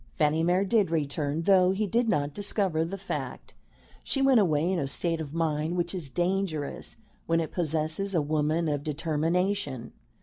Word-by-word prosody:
Fanny 155 +1 +2
Mere 180 +4 +2
did 205 -3 +2
return, 150 0 -1
though 185 0 +5
he 210 +2 0
did 230 +3 +1
not 145 -7 0
discover 195 -4 0
the 180 +4 -4
fact. 195 +1 -6 0.5
She 275 - -1
went 270 -3 +5
away 160 -5 +2
in 185 - 0
a 140 - -1
state 165 +4 -1
of 145 -3 -6
mind 160 +1 -1
which 175 +1 -1
is 170 -7 -4
dangerous 175 - -2 0.3
when 165 0 +2
it 160 - -3
possesses 160 +3 -1
a - - +4
woman 155 +2 0
of 145 -2 -1
determination. 160 - -1
165 Hz, 170 wpm, -27 LUFS, 150-190 Hz, 0.5 s, though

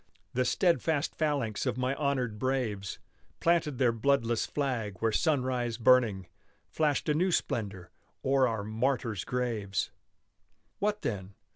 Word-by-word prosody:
The 125 +1 +1
steadfast 165 -4 +1
phalanx 140 -9 -1
of - - 0
my 130 +1 0
honored 130 -7 -1
braves 115 -7 -1 0.4
Planted 165 -5 +2
their 125 -2 +4
bloodless 115 -1 +1
flag 125 -8 -2
where 115 0 +1
sunrise 125 -4 0
burning, 115 -6 +4 0.5
Flashed 150 -3 +1
a 150 - +3
new 180 +5 +2
splendor 100 - -2 0.3
o'er 135 -1 +4
our 110 -3 -2
martyrs' 115 -1 -1
graves! 115 -6 -2 0.9
What 210 +1 0
then? 95 -3 -4
125 Hz, 125 wpm, -30 LUFS, 110-140 Hz, 0.9 s, their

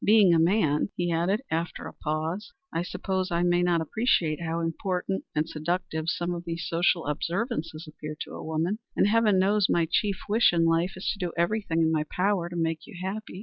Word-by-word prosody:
Being 205 -4 +6
a 165 - +4
man," 165 -2 +2
he 175 -1 -1
added, 180 +8 +1
after 165 +2 -2
a - - -7
pause, 160 - -3 0.2
"I 165 - 0
suppose 185 +1 -2
I 170 0 +1
may 175 0 +3
not 175 -2 +2
appreciate 165 - +1
how 165 0 -2
important 180 +3 -2
and 150 +1 +1
seductive 160 0 -2
some 175 +1 -1
of 170 0 -5
these 170 -1 -4
social 170 0 +2
observances 165 - -2
appear 155 0 -7
to - - -6
a - - -7
woman, 160 +7 -1 0.2
and - - +4
heaven 215 -2 +4
knows 200 +1 +3
my 170 -1 +3
chief 200 +4 0
wish 215 -1 +4
in 165 -1 +3
life 165 +3 +2
is 185 - -6
to 205 - -11
do 175 - -2
everything 170 -2 +1
in 160 - +3
my 155 -1 +1
power 180 +1 0
to 175 - -7
make 165 -1 -1
you - - -11
happy. 190 +1 -5
175 Hz, 205 wpm, -27 LUFS, 165-195 Hz, 0.2 s, Being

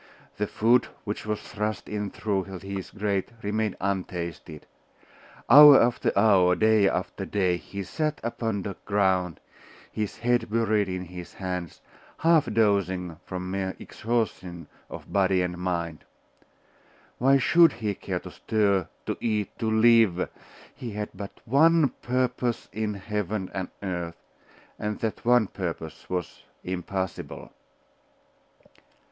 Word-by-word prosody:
The 105 - -1
food 120 +5 +3 0.2
which 105 0 -5
was 105 -1 -1
thrust 105 -1 -4
in 105 -1 -3
through 100 -2 -2
his 95 0 -6
grate 100 -2 -2
remained 105 0 -1
untasted; 90 -5 -4 0.8
hour 145 +2 +10
after 120 +1 +2
hour, 95 -4 +5
day 110 -2 +4
after 95 +1 -3
day, 95 -2 +1
he 100 +4 -7
sat 155 - -2
upon 115 -3 -2
the 100 0 -5
ground, 95 -4 +1 0.5
his 105 -2 -3
head 120 0 +1
buried 110 -3 +1
in 90 0 -3
his 90 0 -10
hands, 90 -3 -5 0.4
half 160 -7 +3
dozing 95 -6 +1
from 90 0 -5
mere 95 -1 -2
exhaustion 105 -7 -3 0.2
of - - -10
body 95 -2 +3
and 90 0 -4
mind. 85 -3 -3 1.2
Why 135 +2 +5
should 170 +6 +5
he 110 -3 -2
care - - -4
to - - -10
stir, 100 -5 +1 0.2
to - - -2
eat, 105 -3 -1
to 110 - 0
live? 110 -5 +4 0.4
He 120 -4 -7
had 105 0 -4
but 100 +1 -8
one 155 +4 +5
purpose 125 -1 -1
in 105 -1 -2
heaven 100 -1 -3
and 95 -2 -3
earth: 85 -3 -4 0.6
and 105 0 -2
that 110 -2 -3
one 120 -1 +4
purpose 85 -5 -6
was 90 -3 -4 0.2
impossible. 95 0 -4
100 Hz, 130 wpm, -26 LUFS, 90-110 Hz, 1.2 s, hour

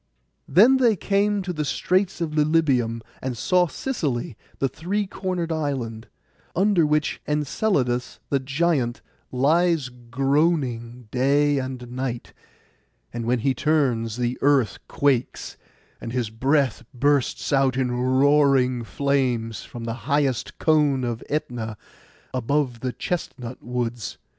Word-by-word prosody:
Then 220 - +6
they 240 -4 +4
came 200 +2 +1
to 180 -1 -3
the 155 -2 -2
straits 185 +6 0
by - - +2
Lilybæum, 150 -7 +1 0.2
and 130 -2 -3
saw 180 +9 +3
Sicily, 145 - -3 0.2
the 135 - +1
three 190 +9 -2
cornered 185 -3 -3
island, 130 -8 -3 0.5
under 185 -4 +3
which 150 0 0
Enceladus 145 - 0
the 140 - +3
giant 135 -2 0 0.3
lies 155 +2 +2
groaning 125 -1 -1
day 140 +2 +2
and 130 -2 -6
night, 125 -1 -4 0.8
and 120 -1 -4
when 125 +1 +2
he 135 +2 +2
turns 125 -6 +1
the 125 0 -1
earth 135 -8 +3
quakes, 135 -4 0 0.5
and 115 - -5
his 120 -3 -2
breath 135 +1 +1
bursts 145 +2 +1
out 135 -2 +3
in 130 -2 0
roaring 130 0 +3
flames 125 -4 -1
from 120 - -9
the 115 0 -3 0.2
highest 140 -5 0
cone 150 -4 +2
of 120 -2 -3
Ætna, 120 -7 -3 0.6
above 130 0 0
the 130 +1 -2
chestnut 130 -7 -5
woods. 120 -2 -3
135 Hz, 125 wpm, -24 LUFS, 120-155 Hz, 0.8 s, Then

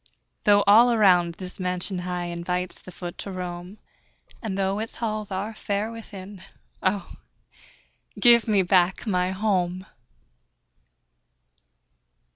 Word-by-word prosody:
Though 205 -1 +5
all 225 +4 +7
around 180 -6 +4
this 185 +1 -8
mansion 180 +1 0
high 180 0 -3
Invites 175 +1 -2
the 185 - -11
foot 175 -1 -8
to 200 - -5
roam, 180 +1 -6 0.6
And 205 -4 -4
though 195 +1 0
its 225 +1 -5
halls 215 -2 -3
are 200 +3 -3
fair 210 +1 -2
within 200 -4 -10 0.4
Oh, 190 -1 -2 1.0
give 235 +1 +6
me 205 -3 +3
back 180 +2 +2
my 180 -4 +1
HOME! 185 -2 -1
190 Hz, 115 wpm, -25 LUFS, 180-210 Hz, 1.0 s, all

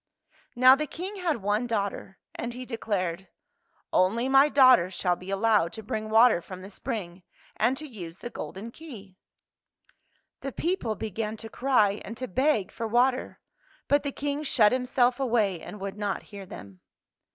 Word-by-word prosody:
Now 255 +2 +8
the 300 +3 0
King 375 +8 -6
had 330 - -1
one 210 +4 0
daughter, 200 -3 -3 0.2
and 235 +1 -5
he 255 +1 -7
declared, 190 -7 -3 0.3
" - - -48 0.3
Only 225 +7 +2
my 270 +2 +6
daughter 255 -9 +6
shall 180 -1 0
be 185 +2 -9
al 195 - 0
lowed 210 -5 +2
to 220 - -8
bring 215 +1 -4
water 220 -4 +5
from 185 +2 -10
the 195 - -10
spring, 190 -7 -5 0.3
and 260 +2 +1
to 310 - -6
use 185 - -9
the 240 - -8
golden 215 +5 -7
key! 215 - -12 0.6
" - - -41
The 275 - -5
people 330 -11 -1
began 220 +1 -4
to 225 +1 -8
cry 220 -6 +2
and 225 - -8
to 255 - -4
beg 260 -1 +1
for 230 - -4
water. 250 +3 +1 0.5
But 285 0 +3
the 285 - -3
King 285 +1 -3
shut 230 -8 +3
himself 250 0 +1
away 220 -9 +1
and 210 - -9
would 195 +1 -5
not 205 -2 -2
hear 200 -2 -10
them. 100 - -11
225 Hz, 175 wpm, -27 LUFS, 195-260 Hz, 0.6 s, Now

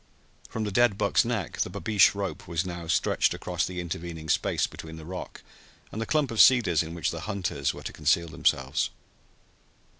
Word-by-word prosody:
From 110 - -3
the 105 - -2
dead 120 -1 +3
buck's 100 - +3
neck 115 -8 -3
the - - 0
babeesh 100 +2 +3
rope 100 -1 -4
was 85 +1 -1
now 85 -2 -6
stretched 80 - +2
across - - -2
the 90 -1 -5
intervening 85 -2 -6
space - - +1
between 80 0 -9
the 80 -1 -10
rock 90 +2 -7 0.5
and 110 - -5
the 115 - -3
clump 150 -4 +1
of 115 - +4
cedars 110 - +5
in 85 +1 -6
which 85 - -1
the - - -5
hunters 90 -9 -1
were - - -10
to - - -6
conceal 75 +3 +2
themselves. 80 - 0
90 Hz, 185 wpm, -27 LUFS, 80-110 Hz, 0.5 s, cedars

